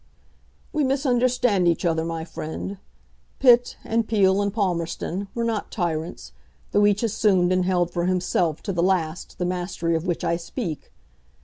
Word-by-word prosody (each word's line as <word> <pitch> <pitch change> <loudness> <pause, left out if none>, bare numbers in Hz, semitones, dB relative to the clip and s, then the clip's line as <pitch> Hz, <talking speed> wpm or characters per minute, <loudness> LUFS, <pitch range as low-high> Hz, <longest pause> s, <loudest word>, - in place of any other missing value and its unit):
"We 305 -1 +1
misunderstand 250 - +2
each 170 +2 +1
other, 160 -1 +1
my 165 -1 -4
friend. 165 +4 -6 0.6
Pitt, 245 -2 +5
and 230 -1 0
Peel, 200 -3 +3
and 200 0 0
Palmerston 185 -1 -2
were 235 - -1
not 225 -3 -2
tyrants, 170 -4 -3 0.4
though 205 0 +4
each 205 +2 +1
assumed 195 -5 +2
and 185 -1 +1
held 175 -2 +1
for 170 0 0
himself 180 -3 0
to 195 - -2
the 170 - 0
last 175 -2 -1
the 180 - -1
mastery 175 -2 -1
of 165 +3 -2
which 175 - -1
I 170 - +1
speak. 170 - -5
185 Hz, 155 wpm, -24 LUFS, 170-215 Hz, 0.6 s, Pitt